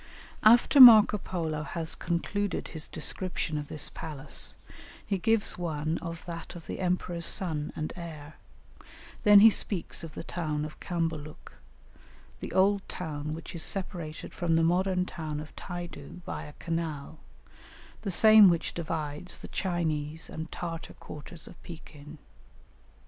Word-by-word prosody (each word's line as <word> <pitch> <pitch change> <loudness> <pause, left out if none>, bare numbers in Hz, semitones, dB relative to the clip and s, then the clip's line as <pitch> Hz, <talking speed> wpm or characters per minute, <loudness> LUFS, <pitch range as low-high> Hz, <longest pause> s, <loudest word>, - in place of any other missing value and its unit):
After 240 +6 +6
Marco 220 -4 +10
Polo 165 -5 -3
has 160 +1 -3
concluded 200 +4 -2
his 160 -2 -4
description 160 +1 -2
of 145 - -6
this 150 0 -4
palace, 150 -3 -3 0.5
he 195 -3 -1
gives 225 -1 +2
one 160 -1 -2
of 165 -1 -7
that 170 -1 -7
of 170 - -10
the - - -6
emperor's 180 -2 -1
son 155 -5 -1
and 155 - -4
heir; 155 -4 -9 0.8
then 205 -1 +8
he 225 +1 +9
speaks 195 -5 -2
of 165 - -9
the - - -6
town 155 -4 -3
of 155 - -10
Cambaluc, 165 -3 -4 0.9
the - - -6
old 195 +1 +3
town 155 -3 -4
which 165 +2 -9
is 170 - -4
separated 170 -4 -4
from 170 -2 0
the 165 - +3
modern 180 +2 +2
town 155 -4 -5
of 155 +1 -10
Taidu 175 -2 -8
by - - -5
a 150 - -11
canal, 160 -3 -4 0.8
the 210 - -3
same 215 +1 +8
which 170 -2 0
divides 155 0 -4
the - - -10
Chinese 160 -4 -2
and 160 +1 -6
Tartar 165 -2 -6
quarters 155 +3 -9
of 180 - -14
Pekin. 155 -2 -11
165 Hz, 145 wpm, -29 LUFS, 155-185 Hz, 0.9 s, Marco